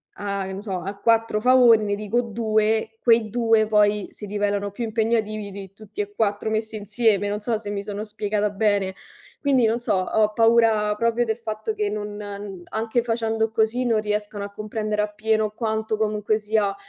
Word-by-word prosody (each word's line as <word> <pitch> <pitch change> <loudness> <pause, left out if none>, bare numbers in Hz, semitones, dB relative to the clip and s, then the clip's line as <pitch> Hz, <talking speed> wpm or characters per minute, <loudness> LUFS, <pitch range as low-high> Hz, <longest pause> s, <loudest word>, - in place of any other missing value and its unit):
a 200 -1 -3
non 195 +1 -6
so, 205 -3 -5
a 200 +1 -6
4 225 -1 +2
favori, 245 -3 +6
ne 205 - 0
dico 210 +3 -1
2, 220 -1 0
quei 230 -2 +4
2 225 -1 +3
poi 210 -1 +3
si 210 - -9
rivelano 205 0 -1
più 220 +4 -5
impegnativi 215 -2 -1
di 195 -1 -9
tutti 210 0 -7
e 205 0 -6
4 205 0 0
messi 220 0 -2
insieme, 210 -1 +1
non 205 - -2
so 225 +1 -1
se 210 -1 -7
mi 200 -1 -3
sono 205 0 -5
spiegata 210 -1 -1
bene. 200 -2 +1 0.5
Quindi 270 -4 +3
non 230 +2 0
so, 235 - -1
ho 210 +3 +1
paura 225 -2 +4
proprio 230 +2 +1
del 220 0 -1
fatto 220 -1 -4
che 210 -1 -1
non 205 -2 -6
anche 225 +2 0
facendo 225 -1 0
così 225 +3 +1
non 230 -3 +2
riescano 210 -1 -3
a 200 - -6
comprendere 215 0 -2
appieno 215 +1 0
quanto 220 -1 -2
comunque 215 0 0
sia, 210 -2 0
215 Hz, 180 wpm, -23 LUFS, 205-225 Hz, 0.5 s, favori